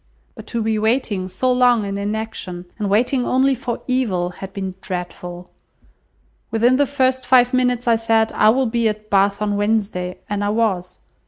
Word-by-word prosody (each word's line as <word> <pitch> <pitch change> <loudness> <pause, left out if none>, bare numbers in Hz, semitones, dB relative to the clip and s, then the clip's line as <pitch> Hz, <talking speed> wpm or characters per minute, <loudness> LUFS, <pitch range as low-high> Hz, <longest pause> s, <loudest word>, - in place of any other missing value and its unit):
But - - -12
to 230 -1 -2
be 220 -1 0
waiting 220 -4 0
so 190 +8 0
long 245 -3 +3
in 200 0 -4
inaction, 200 -3 -4
and 205 -2 -1
waiting 245 +5 +2
only 265 +2 +2
for 245 -2 -4
evil, 215 -9 0
had 195 +2 -9
been 190 -1 -5
dreadful. 180 0 -6 1.0
Within 235 +3 +3
the 285 0 +2
first 260 -2 0
five 250 0 +5
minutes 250 -1 +1
I 230 -1 +4
said, 225 0 +2
'I 215 - +4
will 260 +4 +3
be 230 -1 +1
at 215 0 -7
Bath 200 +1 +2
on 205 -1 0
Wednesday,' 205 -4 -1
and 205 0 -2
I 205 - 0
was. 205 -5 -1
220 Hz, 175 wpm, -20 LUFS, 200-245 Hz, 1.0 s, five